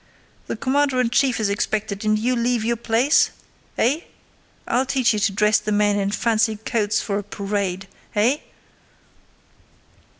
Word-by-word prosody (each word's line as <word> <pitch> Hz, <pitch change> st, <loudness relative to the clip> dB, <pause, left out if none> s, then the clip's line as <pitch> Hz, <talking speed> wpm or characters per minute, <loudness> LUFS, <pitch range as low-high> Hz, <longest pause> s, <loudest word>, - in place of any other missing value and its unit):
The -, -, -3 dB
commander 270 Hz, +2 st, +1 dB
in 240 Hz, -2 st, +1 dB
chief 255 Hz, 0 st, +2 dB
is 215 Hz, -, +1 dB
expected 205 Hz, 0 st, -2 dB
and 215 Hz, 0 st, +2 dB
you 245 Hz, +4 st, 0 dB
leave 235 Hz, -1 st, 0 dB
your 235 Hz, +1 st, +1 dB
place? 235 Hz, +5 st, +2 dB, 0.5 s
Eh? 275 Hz, +7 st, +2 dB, 0.7 s
I'll 245 Hz, +2 st, +2 dB
teach 260 Hz, -4 st, +2 dB
you 210 Hz, -, -1 dB
to 205 Hz, -, +1 dB
dress 210 Hz, +2 st, +3 dB
the 210 Hz, 0 st, -4 dB
men 205 Hz, 0 st, +2 dB
in 195 Hz, 0 st, 0 dB
fancy 220 Hz, +1 st, +1 dB
coats 215 Hz, -1 st, -1 dB
for 200 Hz, -1 st, -2 dB
a -, -, -6 dB
parade.... 195 Hz, -2 st, -3 dB, 0.3 s
Eh...?" 235 Hz, +7 st, +3 dB
220 Hz, 155 wpm, -22 LUFS, 205-240 Hz, 0.7 s, dress